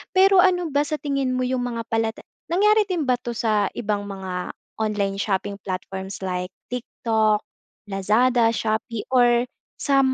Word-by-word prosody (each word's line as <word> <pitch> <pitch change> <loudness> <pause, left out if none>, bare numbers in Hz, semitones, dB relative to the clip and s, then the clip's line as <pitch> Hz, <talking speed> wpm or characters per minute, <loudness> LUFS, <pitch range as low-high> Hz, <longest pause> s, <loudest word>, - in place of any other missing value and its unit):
Pero 385 0 +6
ano 355 -4 +3
ba 285 +1 +3
sa 305 - -1
tingin 275 -3 -1
mo 255 - 0
yung 250 0 0
mga 230 -1 -3
palatan 225 -1 -1 0.3
nangyari 420 +4 +4
din 345 -4 0
ba 250 -1 +2
'to 240 -1 -5
sa 215 -3 +2
ibang 205 -2 -2
mga 185 -2 -5 0.3
online 200 -2 -1
shopping 200 0 -1
platforms 190 +1 -5
like 180 -1 -2 0.2
TikTok, 220 -3 0 0.5
Lazada, 225 +5 +3
Shopee 220 0 -2
or 240 -1 +5 0.3
sa 275 -1 +2
230 Hz, 150 wpm, -23 LUFS, 200-260 Hz, 0.5 s, Pero